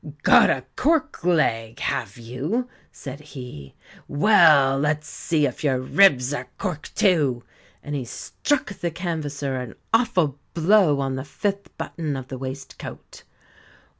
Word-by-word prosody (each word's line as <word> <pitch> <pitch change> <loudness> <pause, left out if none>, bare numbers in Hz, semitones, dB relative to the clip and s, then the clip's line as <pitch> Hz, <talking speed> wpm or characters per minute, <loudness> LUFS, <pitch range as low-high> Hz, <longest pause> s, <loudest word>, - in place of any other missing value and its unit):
"Got - - +7
a - - 0
cork 315 - +1
leg, 115 -10 +1
have 110 -6 -2
you?" 135 - -3 0.2
said 140 0 -8
he 125 - -10 0.3
"Well, 145 -6 +5
let's 150 +1 0
see 155 -3 0
if 130 +1 -4
your 135 -3 +2
ribs 130 -2 +4
are - - -4
cork 180 -7 -4
too," 145 - +2 0.4
and 145 - -6
he 140 -3 -2
struck 255 - -2
the 175 -2 -3
canvasser 150 -5 -3
an 125 -2 -6 0.2
awful 180 - +2 0.2
blow 170 -4 +4
on 135 -1 -2
the 130 - -4
fifth 200 +6 -4
button 155 -4 -4
of 130 -1 -7
the 130 - -6
waistcoat. 135 +1 -8
145 Hz, 135 wpm, -23 LUFS, 130-175 Hz, 0.4 s, Got